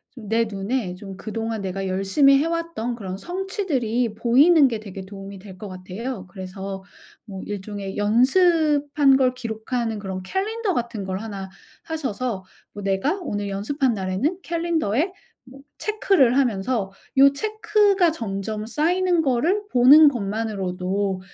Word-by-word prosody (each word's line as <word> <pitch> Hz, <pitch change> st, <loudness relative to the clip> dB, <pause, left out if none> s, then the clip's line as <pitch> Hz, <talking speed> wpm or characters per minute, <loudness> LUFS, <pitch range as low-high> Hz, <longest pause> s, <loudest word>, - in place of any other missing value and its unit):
내 225 Hz, -1 st, 0 dB
눈에 205 Hz, 0 st, -3 dB
좀 190 Hz, +1 st, -9 dB
그동안 225 Hz, +1 st, -4 dB
내가 195 Hz, 0 st, -3 dB
열심히 195 Hz, +10 st, +4 dB
해 285 Hz, -, +1 dB
왔던 335 Hz, -8 st, -2 dB
그런 190 Hz, -5 st, -6 dB
성취들이 280 Hz, -, -2 dB
보이는 275 Hz, +8 st, +5 dB
게 230 Hz, -4 st, -3 dB
되게 195 Hz, -2 st, -8 dB
도움이 195 Hz, 0 st, -9 dB
될 190 Hz, -1 st, -12 dB
것 210 Hz, -, -8 dB
같아요. 190 Hz, +3 st, -6 dB
그래서 190 Hz, +1 st, -7 dB, 0.4 s
뭐 195 Hz, -3 st, -8 dB
일종의 200 Hz, -1 st, -5 dB
연습한 285 Hz, -, +3 dB
걸 255 Hz, -2 st, +2 dB
기록하는 230 Hz, -1 st, -3 dB
그런 190 Hz, -2 st, -5 dB
캘린더 405 Hz, -, -2 dB
같은 235 Hz, -3 st, -3 dB
걸 190 Hz, 0 st, -3 dB
1 200 Hz, -3 st, -6 dB, 0.3 s
사셔서 255 Hz, -, -3 dB, 0.3 s
뭐 205 Hz, -, -8 dB
내가 195 Hz, -, 0 dB
오늘 205 Hz, -, -3 dB
연습한 245 Hz, +7 st, 0 dB
날에는 195 Hz, -, -1 dB
캘린더에 330 Hz, -, 0 dB, 0.3 s
뭐 260 Hz, +2 st, -14 dB, 0.2 s
체크를 385 Hz, -, +2 dB
하면서 225 Hz, -4 st, 0 dB, 0.3 s
요 275 Hz, +1 st, +7 dB
체크가 420 Hz, -1 st, +2 dB
점점 215 Hz, -4 st, -4 dB
쌓이는 345 Hz, +7 st, +1 dB
거를 315 Hz, +9 st, +1 dB
보는 275 Hz, +6 st, +8 dB
것만으로도 200 Hz, -5 st, -1 dB
230 Hz, 285 characters per minute, -23 LUFS, 195-295 Hz, 0.4 s, 보는